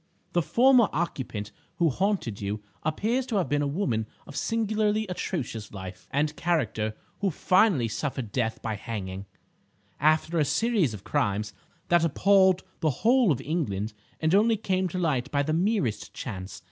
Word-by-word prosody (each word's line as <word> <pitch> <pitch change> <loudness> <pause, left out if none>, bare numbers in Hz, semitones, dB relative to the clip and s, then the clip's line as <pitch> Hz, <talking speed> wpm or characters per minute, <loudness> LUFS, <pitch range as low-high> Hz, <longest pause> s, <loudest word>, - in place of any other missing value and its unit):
The 175 - +3
former 245 - +5
occupant 130 -10 -3 0.2
who 165 -3 +2
haunted 185 - -1
you 105 +1 -3 0.2
appears 225 - 0
to 230 - -2
have 190 -4 +1
been 145 0 +1
a 145 - +1
woman 140 - -1 0.2
of 145 - -11
singularly 215 0 0
atrocious 145 - -4
life 95 -2 -8
and 150 +2 0
character 110 -11 0 0.2
who 200 - +1
finally 180 - +3
suffered 125 -1 -3
death 115 -2 -1
by 110 -2 -2
hanging, 95 -3 -5 0.7
after 155 +3 +2
a - - +4
series 205 - +1
of 100 - -11
crimes 105 +1 -1 0.4
that 175 -1 +4
appalled 190 +3 +4 0.2
the 155 - +2 0.2
whole 245 -4 +5
of 135 - 0
England 110 - -2 0.3
and 160 +1 +1
only 220 +3 +4
came 190 -2 0
to 180 - -5
light 140 -7 0
by 145 -1 +1
the 155 +2 -1
merest 165 - 0
chance. 95 -5 -6
155 Hz, 160 wpm, -27 LUFS, -, 0.7 s, former